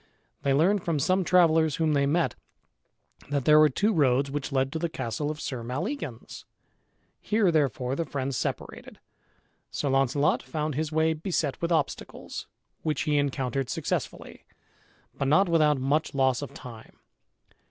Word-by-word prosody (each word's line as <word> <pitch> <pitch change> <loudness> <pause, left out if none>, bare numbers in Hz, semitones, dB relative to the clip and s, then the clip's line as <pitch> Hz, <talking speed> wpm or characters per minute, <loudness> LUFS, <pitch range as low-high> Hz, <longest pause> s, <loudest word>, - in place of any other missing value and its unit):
They 140 - 0
learned 180 +6 +3
from 165 -3 0
some 185 +7 +2
travellers 160 -4 +4
whom 160 -2 +1
they 140 -1 +2
met, 165 +4 +1 1.0
that 140 -3 -1
there 150 0 +7
were 155 0 +6
two 210 - +1
roads 135 -4 +2
which 145 0 -4
led 135 0 0
to 160 - -3
the 170 0 -1
castle 145 +1 -3
of 155 0 -5
Sir 130 -5 -4
Maleagans. 135 - -5 0.8
Here 210 -4 +2
therefore 135 -4 0
the 165 - -1
friends 140 -3 -3
separated. - - -5 0.7
Sir 145 - -2
Launcelot 135 +4 +2
found 155 -2 -3
his 155 +2 -2
way 160 +1 +2
beset 155 -3 -2
with 170 0 -1
obstacles, 160 -4 -3 0.3
which 155 -3 -1
he 150 -1 +1
encountered 135 -2 -1
successfully, - - -4 0.8
but 140 - 0
not 185 +8 +4
without 155 -3 +3
much 140 +4 0
loss 130 -1 +2
of 145 - -6
time. 115 -3 -11
150 Hz, 155 wpm, -27 LUFS, 135-160 Hz, 1.0 s, there